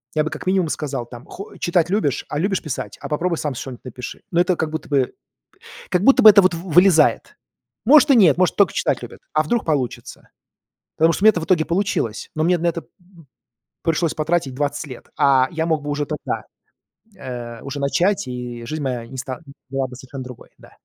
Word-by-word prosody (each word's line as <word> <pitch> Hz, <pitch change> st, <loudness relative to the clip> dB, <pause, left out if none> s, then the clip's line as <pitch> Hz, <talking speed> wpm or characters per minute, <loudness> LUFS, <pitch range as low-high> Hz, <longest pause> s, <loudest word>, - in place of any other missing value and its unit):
Я 155 Hz, -, +3 dB
бы 155 Hz, -, -4 dB
как -, -, -7 dB
минимум 185 Hz, -3 st, +2 dB
сказал, 140 Hz, -5 st, -3 dB
там: 120 Hz, +2 st, -12 dB
"Хо 200 Hz, -, -10 dB
Читать 175 Hz, -1 st, +1 dB
любишь? 145 Hz, -10 st, 0 dB
А 150 Hz, -, -2 dB
любишь 195 Hz, +2 st, 0 dB
писать? 150 Hz, -4 st, -5 dB
А -, -, -7 dB
попробуй 165 Hz, +2 st, -1 dB
сам 150 Hz, -2 st, -2 dB
что-нибудь 130 Hz, -1 st, -8 dB
напиши". 125 Hz, 0 st, -8 dB
Но 170 Hz, -, +1 dB
это 180 Hz, 0 st, +2 dB
как 160 Hz, -2 st, -2 dB
будто 160 Hz, -, -6 dB
бы 135 Hz, -3 st, +1 dB, 0.8 s
как 180 Hz, +1 st, +1 dB
будто 270 Hz, +3 st, +6 dB
бы 220 Hz, -, +10 dB
это 200 Hz, -1 st, +7 dB
вот 185 Hz, -, +3 dB
в 170 Hz, +2 st, -6 dB
вылезает. 175 Hz, -1 st, +4 dB, 0.5 s
Может, 295 Hz, +3 st, +7 dB
и -, -, +6 dB
нет, 190 Hz, -8 st, +5 dB
может 185 Hz, -1 st, +2 dB
только 200 Hz, -, +3 dB
читать -, -, 0 dB
любят, -, -, -10 dB
а -, -, +3 dB
вдруг 240 Hz, -1 st, -1 dB
получится. 140 Hz, -6 st, -3 dB, 0.7 s
Потому 165 Hz, +1 st, +4 dB
что 190 Hz, -, -3 dB
у -, -, +4 dB
меня -, -, +10 dB
это 175 Hz, -, -3 dB
в -, -, -4 dB
итоге 175 Hz, -4 st, +3 dB
получилось, 175 Hz, -, -1 dB
но 155 Hz, -, 0 dB
мне 175 Hz, +2 st, +3 dB
на 170 Hz, -, -4 dB
это, 170 Hz, 0 st, -1 dB
м, -, -, -26 dB, 1.0 s
пришлось 165 Hz, 0 st, 0 dB
потратить 155 Hz, -4 st, -1 dB
20 145 Hz, +2 st, -2 dB
лет, 130 Hz, -, -11 dB
а 130 Hz, -2 st, +4 dB
я 160 Hz, -1 st, -2 dB
мог 160 Hz, -3 st, 0 dB
бы 145 Hz, -, -5 dB
уже 145 Hz, 0 st, -1 dB
тогда, 150 Hz, -, -4 dB, 0.7 s
э, 120 Hz, -7 st, -7 dB
уже 140 Hz, +1 st, -6 dB
начать, 175 Hz, +6 st, +1 dB
и 125 Hz, -2 st, -6 dB
жизнь 155 Hz, +3 st, -4 dB
моя 125 Hz, -4 st, -3 dB
не 130 Hz, -, -10 dB
ста 130 Hz, +1 st, -5 dB, 0.3 s
была 135 Hz, 0 st, -1 dB
бы 125 Hz, -, -11 dB
совершенно 130 Hz, +1 st, -9 dB
другой, 125 Hz, -2 st, -11 dB
да. -, -, -17 dB
155 Hz, 215 wpm, -21 LUFS, 130-180 Hz, 1.0 s, бы